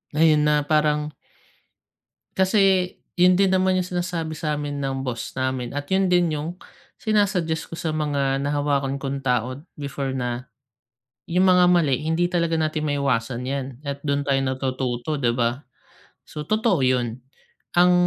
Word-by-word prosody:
Ngayon, 155 -1 +5
ah, 150 -1 +2
parang 150 -1 +1 1.2
Kasi 190 -1 +3 0.2
yun 180 0 +5
din 195 -1 +3
naman 185 0 +3
yung 180 - 0
sinasabi 175 -3 -3
sa'min 150 -2 -3
ng 135 -1 -2
boss 120 +1 -5
namin 130 -2 -1
at 145 - -3
yun 190 -1 +3
din 175 -3 +3
yung, 160 +4 -4 0.4
sina-suggest 190 -7 0
ko - - -6
sa 160 -3 -2
mga 140 -3 0
nahawakan 140 -1 0
kong 135 0 -4
tao 125 0 -1 0.2
before, 140 -2 -4
na 125 +1 -3 0.8
yung 180 +2 +2
mga 180 -1 +6
mali 170 -7 +3
hindi 170 +2 +1
talaga 170 -2 +1
natin 155 -1 -1
maiiwasan 130 -4 0
yan 135 0 -2 0.2
at, 140 -1 -4
dun 140 0 +1
tayo 140 -1 +1
natututo, 130 +1 -2
'di 120 -3 +1
ba? 120 +1 0 0.7
So, 150 -1 -8
totoo 215 - +2
yun. 125 -2 0 0.6
Ang 180 +1 +6
150 Hz, 145 wpm, -23 LUFS, 135-175 Hz, 1.2 s, mga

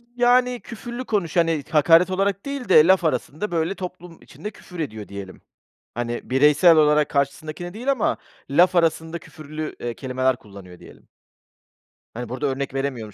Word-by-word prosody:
Yani, 245 0 +3
küfürlü 240 +2 -8
konuş 195 -7 -1
hani, 165 -3 +2
hakaret 165 +4 +5
olarak 195 +2 -1
değil 280 -5 -5
de, 160 -2 +7
laf 190 -1 +4
arasında, 155 - -2
böyle, 170 +3 -1
toplum 180 -2 -9
içinde 210 - -9
küfür 180 -3 -12
ediyor 110 -9 -5
diyelim. 100 -2 -9 0.5
Hani, 120 +1 -4
bireysel 150 +5 +5
olarak 150 -1 +4
karşısındakine 155 +5 -3
değil 250 +6 -1
ama 260 -6 0 0.3
laf 175 +6 +4
arasında 165 0 +1
küfürlü, 155 0 -8
eee, 120 -1 -4
kelimeler 130 +1 -1
kullanıyor, 100 -5 -14
diyelim. - - -16 1.1
Hani, 120 0 -6
burada 130 +4 -3
örnek 135 0 -3
veremiyorum 130 -6 -4
160 Hz, 150 wpm, -22 LUFS, 130-185 Hz, 1.1 s, de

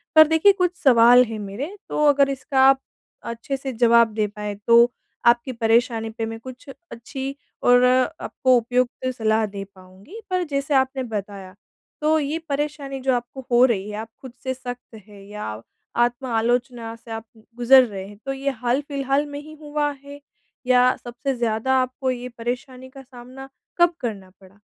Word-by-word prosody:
पर 315 -1 +9
देखिए 320 +5 +5
कुछ 360 -2 0
सवाल 245 -1 +7
हैं 225 -2 -6
मेरे 225 - -6
तो 300 - +1
अगर 280 -1 +4
इसका 265 0 -2
आप 270 0 +4 0.4
अच्छे 235 +4 -4
से 265 -1 -5
जवाब 235 -1 +4
दे 210 -1 0
पाएँ, 210 0 -6
तो 235 +1 +6 0.3
आपकी 240 +2 +3
परेशानी 225 -1 +1
पे 225 0 -4
मैं 225 0 -6
कुछ 255 +3 -11 0.2
अच्छी 265 +4 -6 0.3
और 245 0 +5 0.4
आपको 255 -1 +2
उपयुक्त 250 +2 -1
सलाह 220 0 +2
दे 200 -1 -6
पाऊँगी। 190 - -14
पर 365 -1 0
जैसे 280 +1 -1
आपने 265 0 +1
बताया, 200 -4 -6 0.5
तो 310 +1 +3
ये 295 +2 -2
परेशानी 285 -1 -3
जो 265 0 +1
आपको 245 +2 -6
हो 240 +1 +6
रही 210 -4 -1
है, 210 - -6
आप 220 +1 -6
खुद 260 -3 -10
से 260 - -2
सख्त 245 -2 -9
हैं 200 -1 -14
या 110 - -6 0.4
आत्म-आलोचना 240 -1 -2
से 230 0 -14
आप 225 0 -5
उ - - -18 0.2
गुज़र 255 +2 +7
रहे 195 -4 -7
हैं, 205 0 -13
तो 270 - -2
ये 275 +1 -2
हाल-फिलहाल 275 +2 0
में 285 0 -7
ही 310 +1 -12
हुआ 295 0 -1
है 285 0 -11 0.5
या 250 0 +4
सबसे 250 +3 -4
ज़्यादा 235 +3 0
आपको 255 +1 -2
ये 250 0 -5
परेशानी 255 +2 -5
का 270 +1 -12
सामना 255 +1 -12 0.3
कब 345 0 +4
करना 200 -6 -5
पड़ा? 190 +1 -19
245 Hz, 170 wpm, -22 LUFS, 225-270 Hz, 0.5 s, पर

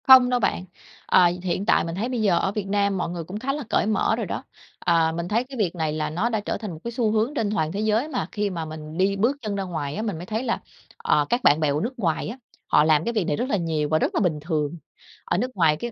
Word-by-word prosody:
Không 260 -1 +9
đâu 250 -1 +2
bạn, 185 -4 0 0.4
ờ, 185 - +5 0.2
hiện 185 +2 -1
tại - - +4
mình 165 0 -4
thấy 220 +6 -2
bây 245 -3 -1
giờ 185 -5 +3
ở 195 - 0
Việt 205 -1 -3
Nam 200 0 +1
mọi 175 - -2
người 170 -1 -4
cũng 190 +6 -6
khá 270 +4 -1
là 295 0 -4
cởi - - +2
mở 215 -2 +2
rồi - - -3
đó. - - -4 0.4
À, 165 -1 +3
mình 170 +1 -3
thấy 225 +5 +1
cái 260 +1 -10
việc 185 -6 0
này 160 -3 -1
là 155 0 -2
nó 180 +10 0
đã 220 -2 0
trở 205 - -3
thành 215 -4 -6
một 160 - -8
cái 235 - -4
xu 230 -3 0
hướng 220 +5 +1
trên 220 -8 -1
toàn 160 -7 0
thế 195 - -3
giới 220 +5 +1
mà 255 -5 -2
khi 205 -1 -1
mà 170 -4 -4
mình 155 0 -8
đi 195 +2 +2
bước 235 +8 +1
chân 210 -3 -3
ra 195 - -2
ngoài 155 -6 -4
á, 215 - -2
mình 210 -6 -2
mới 170 - -7
thấy 220 +5 -2
là, 235 - -1 0.4
à, 150 - +2
các 245 +1 +1
bạn 145 +2 +5
bè 155 -2 +2
của 145 - 0
nước 240 +3 -4
ngoài 165 -6 0
á, 225 +5 -6 0.3
họ - - +5
làm 155 -1 +4
cái 235 - -2
việc 210 -6 0
này 150 - +1
rất 255 - -2
là 210 - +2
nhiều 160 -4 -1
và 155 +1 +3
rất - - 0
là - - +3
bình 165 -6 +1
thường. 155 0 -2 0.5
Ở 175 - 0
nước 250 +6 -1
ngoài 165 -5 +4
cái 240 +8 -5
195 Hz, 300 wpm, -24 LUFS, 160-225 Hz, 0.5 s, Không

